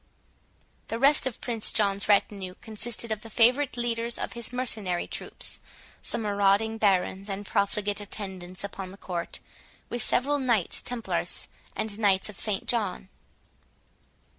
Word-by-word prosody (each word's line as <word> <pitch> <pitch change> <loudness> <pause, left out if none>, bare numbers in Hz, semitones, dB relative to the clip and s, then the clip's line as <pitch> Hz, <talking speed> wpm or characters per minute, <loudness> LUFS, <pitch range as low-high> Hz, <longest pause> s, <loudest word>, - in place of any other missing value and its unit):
The 225 - -2
rest 275 +2 +5
of 250 - -5
Prince 230 -3 0
John's 200 -1 +2
retinue 195 -2 +2
consisted 225 +1 -1
of 215 -1 -1
the 225 - -10
favourite 245 +5 +4
leaders 235 0 0
of - - -3
his 235 -1 -2
mercenary 220 -8 -1
troops, - - -3 0.4
some 225 - -1
marauding 205 +2 +2
barons 195 -1 +2
and 200 +1 -4
profligate 205 0 +1
attendants 190 -3 -6
upon 195 -2 -5
the 195 - -11
court, 175 -4 -4 0.5
with 240 - -2
several 285 +6 +2
Knights 235 -9 +2
Templars 245 -2 -1 0.3
and 215 -1 -3
Knights 200 -2 +3
of 205 - -3
St 210 -3 0
John. 205 -5 0
210 Hz, 140 wpm, -28 LUFS, 195-235 Hz, 0.5 s, rest